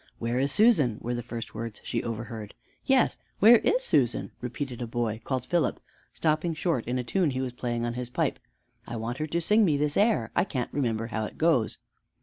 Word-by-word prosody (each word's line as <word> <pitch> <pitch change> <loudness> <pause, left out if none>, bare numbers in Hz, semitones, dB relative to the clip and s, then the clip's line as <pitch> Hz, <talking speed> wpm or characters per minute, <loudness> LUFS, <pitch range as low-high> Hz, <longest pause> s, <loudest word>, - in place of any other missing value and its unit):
"Where 120 +2 -1
is 135 +1 +1
Susan?" 155 - +4
were 120 - -3
the 120 - -2
first 115 0 -7
words 110 -1 -6
she 115 - -2
overheard. 115 -2 -6 0.3
"Yes, 265 -2 +3 0.2
where 225 +3 +8
is - - +2
Susan?" 125 - +1
repeated 125 0 -5
a 120 - -3
boy 115 -1 -2
called 130 -2 -2
Philip, 170 +5 0 0.3
stopping 160 +1 0
short 155 -7 -1
in 125 +1 -1
a 125 - -1
tune 175 +6 +1
he 130 -1 -2
was 125 -2 -4
playing 120 -1 -2
on 120 - -2
his 125 0 -5
pipe: - - -1 0.5
"I 120 - -5
want 115 +3 -4
her 155 - -1
to 170 +3 -1
sing 210 +6 +3
me 155 -7 +3
this 145 0 0
air, 200 - +2
I - - +4
can't 130 -10 -4
remember 115 -5 0
how 110 -2 -2
it - - -9
goes." 155 -9 +2
125 Hz, 210 wpm, -27 LUFS, 115-160 Hz, 0.5 s, where